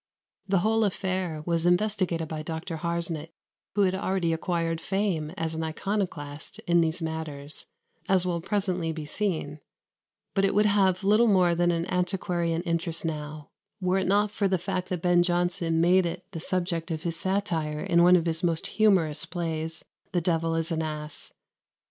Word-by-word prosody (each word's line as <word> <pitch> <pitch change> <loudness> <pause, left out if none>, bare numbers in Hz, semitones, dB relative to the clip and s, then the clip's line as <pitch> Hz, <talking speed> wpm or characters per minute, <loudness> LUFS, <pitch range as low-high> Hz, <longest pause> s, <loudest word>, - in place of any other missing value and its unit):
The 195 0 +3
whole 225 0 +3
affair 185 -5 -1
was 170 0 +1
investigated 175 -3 +1
by 155 0 -4
Dr. 160 +1 -5
Harsnet, 165 -1 -2 0.5
who 205 - +3
had 185 -2 +3
already 190 -3 0
acquired 165 -1 -1
fame 190 -6 -1
as 165 -1 -2
an 160 0 -3
iconoclast 160 -4 -3
in 170 0 +4
these 165 +1 0
matters, 155 -2 -5 0.4
as 185 -2 +3
will 170 -2 -1
presently 185 -4 -1
be 155 -1 -5
seen; 155 -4 -2 0.7
but 195 - +2
it 195 - +2
would 210 +1 +4
have 195 -3 +3
little 215 +4 +5
more 185 -4 +4
than 175 +1 +2
an 170 -1 0
antiquarian 175 -2 -1
interest 170 -1 -2
now, 150 -1 -5 0.3
were 185 0 +1
it 190 - -1
not 205 +2 +3
for 205 -1 +1
the 190 -1 +2
fact 185 +1 -3
that 180 -3 -3
Ben 175 -1 +5
Jonson 175 -2 +1
made 180 +2 +4
it 170 - -6
the 170 - -5
subject 175 -1 -2
of 160 -1 -3
his 170 -1 -1
satire 165 -6 -1
in 170 0 +3
one 180 +1 +7
of 170 -2 +2
his 165 0 0
most 165 -2 0
humorous 180 -9 +2
plays, 160 -2 -3 0.3
"The 175 - +2
Devil 165 -1 +1
is 165 +1 -1
an 160 -1 0
Ass." 150 -1 -5
170 Hz, 175 wpm, -27 LUFS, 160-185 Hz, 0.7 s, one